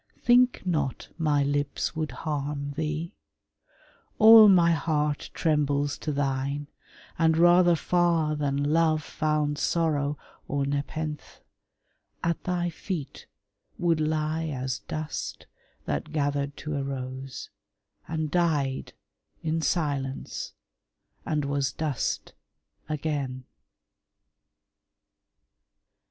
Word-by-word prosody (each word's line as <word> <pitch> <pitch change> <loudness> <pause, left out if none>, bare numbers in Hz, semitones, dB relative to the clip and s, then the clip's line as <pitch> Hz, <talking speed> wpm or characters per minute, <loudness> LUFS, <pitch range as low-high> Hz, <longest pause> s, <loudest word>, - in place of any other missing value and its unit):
Think 245 +1 +4
not 150 -8 -1
my 150 -3 +2
lips 145 +3 -1
would 155 -1 -2
harm 145 -2 -3
thee: 155 +3 -3 1.0
all 220 -1 +10
my 175 -3 +6
heart 150 -2 0
Trembles 145 -2 +1
to 155 - -3
thine, 140 0 -1 0.5
and, 160 -1 +4
rather 175 +1 +6
far 165 -2 +2
than 140 -1 -1
Love 155 +1 +2
Found 150 -2 -1
sorrow 150 -3 0 0.3
or 140 0 0
nepenthe, 145 +2 -4 0.8
at 170 0 -1
thy 175 -2 0
feet 165 -3 -6 0.5
Would 170 -2 +2
lie 155 +1 0
as 130 -3 -3
dust 155 0 -5 0.4
that 155 - -3
gathered 145 -2 -1
to 150 -1 -4
a - - -1
rose, 130 -1 -6 0.6
And 155 -2 -2
died 150 -7 0 0.5
in 160 +1 0
silence, 140 -5 -2 0.7
and 150 -2 0
was 140 -1 0
dust 150 -5 -2 0.6
again. 140 -4 -2
150 Hz, 95 wpm, -27 LUFS, 140-160 Hz, 1.0 s, all